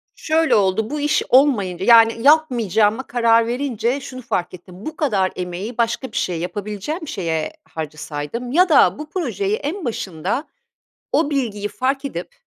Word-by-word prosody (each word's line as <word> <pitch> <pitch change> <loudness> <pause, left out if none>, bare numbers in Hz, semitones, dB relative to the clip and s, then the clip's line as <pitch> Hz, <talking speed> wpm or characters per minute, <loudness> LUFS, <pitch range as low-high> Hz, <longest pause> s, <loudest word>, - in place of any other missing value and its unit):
Şöyle 320 +1 +2
oldu; 205 +2 +1
bu 295 +1 -3
iş 295 +1 +1
olmayınca, 205 -10 +3
yani, 230 -1 +6
yapmayacağıma 240 - +3
karar 230 -1 +3
verince 245 0 -1
şunu 255 -1 -8
fark 180 -7 -2
ettim: 185 +2 -12
Bu 315 - -5
kadar 205 -12 +1
emeği 185 +6 -5
başka 235 +2 -1
bir - - -5
şeye 175 -3 -1
yapabileceğim 210 - -5
şeye 165 - -2
harcasaydım 155 - -6
ya 360 +6 +4
da 295 -1 +5
bu 305 - -7
projeyi 385 - -1
en 335 +2 -4
başında 205 - -3 0.7
o 305 -1 +2
bilgiyi 215 -7 -2
fark 270 +5 -2
edip, 280 - -6
230 Hz, 150 wpm, -20 LUFS, 190-285 Hz, 0.7 s, yani